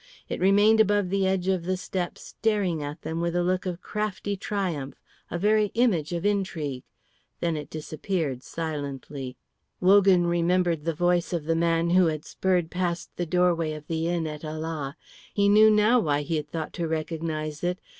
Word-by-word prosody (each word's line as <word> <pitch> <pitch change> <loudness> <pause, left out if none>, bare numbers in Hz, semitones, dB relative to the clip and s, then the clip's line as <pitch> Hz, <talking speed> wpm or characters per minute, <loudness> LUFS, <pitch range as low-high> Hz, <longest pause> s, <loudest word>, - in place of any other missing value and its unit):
It - - -3
remained 205 +4 +5
above 205 -3 +3
the 195 -1 +2
edge 190 -1 0
of 185 -3 +1
the 185 +1 0
step 180 -1 -3
staring 200 -7 -1
at 145 +2 -6
them 165 +1 -3
with 170 0 -1
a 175 - +2
look 185 +1 0
of 180 0 -5
crafty 210 -1 -3
triumph, 180 -10 -3 0.3
a - - -3
very 210 +3 +3
image 200 -11 +2
of 170 +2 -3
intrigue. 170 -10 -1 0.6
Then 170 -2 0
it 150 -1 -6
disappeared 155 -3 -3
silently. 140 -4 -5 0.4
Wogan 190 -1 +5
remembered 170 -2 +1
the 165 -1 -1
voice 175 +1 +1
of 165 -4 -2
the 165 - +1
man 165 0 +2
who 180 -1 +5
had 155 -1 -3
spurred 180 -3 0
past 175 -1 -2
the 175 - -3
doorway 170 -2 +2
of 150 -1 -8
the 165 +1 -2
inn 170 -1 0
at 150 -1 -6
Ala. 155 -1 -4 0.4
He 200 -1 +3
knew 215 +2 +7
now 215 +3 +5
why 145 -7 +1
he 160 +2 -1
had 150 -1 -5
thought 160 0 -4
to 170 -2 -2
recognise 155 -1 -3
it. 180 +1 0
170 Hz, 180 wpm, -26 LUFS, 155-190 Hz, 0.6 s, knew